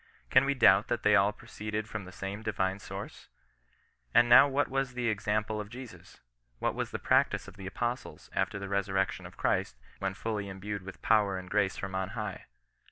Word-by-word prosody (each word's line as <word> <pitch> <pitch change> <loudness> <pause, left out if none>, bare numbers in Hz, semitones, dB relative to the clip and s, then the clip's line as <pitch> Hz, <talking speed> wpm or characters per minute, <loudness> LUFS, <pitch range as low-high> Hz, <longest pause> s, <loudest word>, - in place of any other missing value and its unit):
Can 130 +1 +6
we 140 0 +1
doubt 105 -5 +6
that 120 - -1
they 105 0 +5
all 100 0 +4
proceeded 105 +1 -5
from 105 -2 -5
the 95 - -10
same 100 +3 -5
Divine 95 -3 -1
source? - - -8 0.9
And 120 - +7
now 120 +4 +9
what 140 0 +1
was 135 -1 -2
the 120 -2 0
example 105 0 -1
of 105 - -9
Jesus? 125 0 -11 0.4
What - - 0
was - - -3
the - - -4
practice - - +2
of - - -11
the 95 -1 -8
Apostles, 120 +5 -4
after - - 0
the 100 0 -5
resurrection 95 -1 -1
of - - -16
Christ, - - 0 0.2
when 95 -1 -2
fully 105 -2 -3
endued 100 +1 -5
with 95 +1 -11
power 105 -4 +3
and 90 0 -8
grace 100 -2 +1
from 95 -1 -5
on 95 0 -2
high - - -4
105 Hz, 195 wpm, -30 LUFS, 95-115 Hz, 0.9 s, now